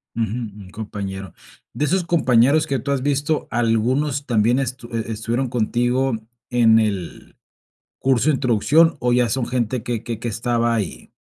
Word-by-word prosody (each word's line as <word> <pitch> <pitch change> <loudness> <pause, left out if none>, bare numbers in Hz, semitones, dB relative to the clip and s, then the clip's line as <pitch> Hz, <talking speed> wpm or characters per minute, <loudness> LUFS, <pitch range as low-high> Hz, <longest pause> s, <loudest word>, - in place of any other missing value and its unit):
Ujú. 115 - 0
Un 105 -4 -6
compañero. 95 -4 -6 0.4
¿De 150 - 0
esos 180 +5 +1
compañeros 155 -2 +3
que 135 -3 -1
tú 140 - -3
has 140 -2 0
visto, 145 +2 0
algunos 125 +5 0
también 120 +1 +2
estu 125 -2 -4
e 115 0 -3
estuvieron 115 +4 -2
contigo 120 +2 0 0.3
en 115 -2 +5
el 100 -6 -3 0.6
curso 135 +2 +2
de - - +2
introducción, 145 +7 +3
o 125 0 +1
ya 120 -1 +3
son 130 0 -1
gente 125 -1 -1
que 115 -1 -3
que 115 -2 -5
que 115 - -4
estaba 115 +1 0
ahí? 105 -7 -4
120 Hz, 160 wpm, -21 LUFS, 110-135 Hz, 0.6 s, en